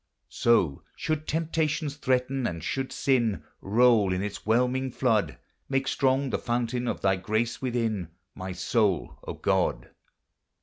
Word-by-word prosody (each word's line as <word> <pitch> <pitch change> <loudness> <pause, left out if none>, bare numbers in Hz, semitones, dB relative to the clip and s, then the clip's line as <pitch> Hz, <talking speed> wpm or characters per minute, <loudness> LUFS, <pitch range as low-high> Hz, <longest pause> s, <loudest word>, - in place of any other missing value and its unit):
So, 95 -12 +2
should 155 -1 -2
temptations 155 -2 -1
threaten, 130 -1 0
and 85 -2 -5
should 135 +8 -2
sin 120 -7 +1 0.2
Roll 110 -1 +4
in 90 +1 -1
its 105 0 -6
whelming 125 +3 +2
flood, 115 -4 +1 0.3
Make 135 0 0
strong 135 0 +1
the - - 0
fountain 120 +1 -1
of - - -2
thy 95 -1 +2
grace 110 +5 -1
within 115 -7 -1 0.3
My 95 0 -6
soul, 95 -2 0
O - - -3
God - - 0
120 Hz, 135 wpm, -27 LUFS, 105-130 Hz, 0.3 s, Roll